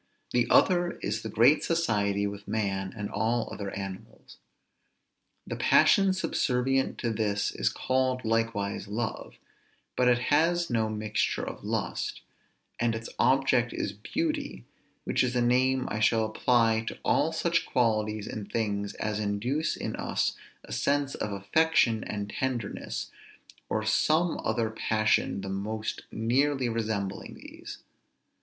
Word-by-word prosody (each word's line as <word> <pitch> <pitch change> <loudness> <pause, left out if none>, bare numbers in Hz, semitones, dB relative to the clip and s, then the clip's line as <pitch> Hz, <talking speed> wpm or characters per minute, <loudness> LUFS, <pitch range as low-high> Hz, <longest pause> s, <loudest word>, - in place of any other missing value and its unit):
The 120 -1 +2
other 175 -1 +4
is - - -1
the 110 - -5
great 125 +8 +4
society 105 -11 +1
with 100 0 -6
man 95 -3 -1
and 105 -1 -3
all 115 +4 0
other 100 -1 -4
animals. 95 -1 -8 1.1
The - - -4
passion 195 -1 +5
subservient 135 -7 0
to 120 - -1
this 105 -2 0
is - - 0
called 130 -1 0
likewise 110 -3 -1
love, 110 +3 -4 0.6
but 125 - +3
it 125 -1 +5 0.2
has 170 +1 +2
no 110 -2 +1
mixture 110 0 -1
of - - -7
lust, - - -3 0.6
and 120 -1 +1
its 115 0 -6
object 130 -2 +3
is 100 - -3
beauty; 300 - -3 0.4
which - - +1
is 125 0 -1
a - - +3
name 130 +2 +2
I 110 - -2
shall 110 0 +3
apply 115 0 +2
to - - -4
all - - +3
such - - 0
qualities 110 -3 +1
in 105 - -5
things 100 -3 -2
as 105 -1 -2
induce 110 +9 -1
in - - -4
us - - -1 0.3
a - - -13
sense 140 -1 0
of 105 - -3
affection 110 +3 +2
and 105 -1 -4
tenderness, 125 -6 -3 0.6
or 110 0 -1
some 160 +9 +2
other 110 0 0
passion 110 -2 +1
the 95 - -5
most 110 +3 -3
nearly 130 +3 +1
resembling 110 -4 -3
these. - - -11
115 Hz, 135 wpm, -28 LUFS, 105-130 Hz, 1.1 s, passion